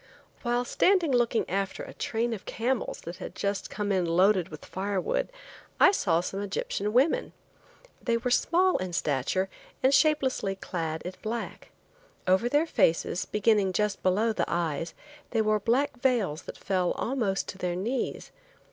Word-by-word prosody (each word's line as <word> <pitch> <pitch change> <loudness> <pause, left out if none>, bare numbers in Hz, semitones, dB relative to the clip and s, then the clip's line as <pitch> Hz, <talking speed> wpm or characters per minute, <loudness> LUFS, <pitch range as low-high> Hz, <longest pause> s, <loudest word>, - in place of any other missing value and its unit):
While 240 0 0
standing 365 +1 +3
looking 240 -2 +2
after 195 0 -2
a - - -9
train 230 +1 -1
of 210 - -7
camels 245 +1 -2
that 170 +1 -7
had - - -8
just 200 0 -2
come 205 -1 -2
in 190 -2 +2
loaded 180 +2 +3
with 155 - -10
firewood 200 - -2 0.5
I - - +8
saw 170 - +2
some 195 +2 -4
Egyptian 205 +1 -2
women. 285 - +2 0.7
They 235 -1 +1
were 245 +2 -2
small 360 +8 +3
in 185 -1 -4
stature 155 +5 0 0.4
and 265 +1 +5
shapelessly 265 -10 +2
clad 165 -4 -4
in 180 - -5
black. 225 +1 -5 0.6
Over 190 +6 +3
their 295 +5 +3
faces, 170 - +1
beginning 210 -2 +2
just 210 +1 0
below 210 +5 +2
the - - 0
eyes, 165 -1 -2 0.3
they 225 - +1
wore 215 0 +2
black 265 +7 +1
veils 220 - +1
that - - -7
fell 185 -2 0
almost 225 -6 -1
to 190 - -7
their 180 -1 -1
knees. 235 +8 -3
205 Hz, 155 wpm, -28 LUFS, 185-245 Hz, 0.7 s, I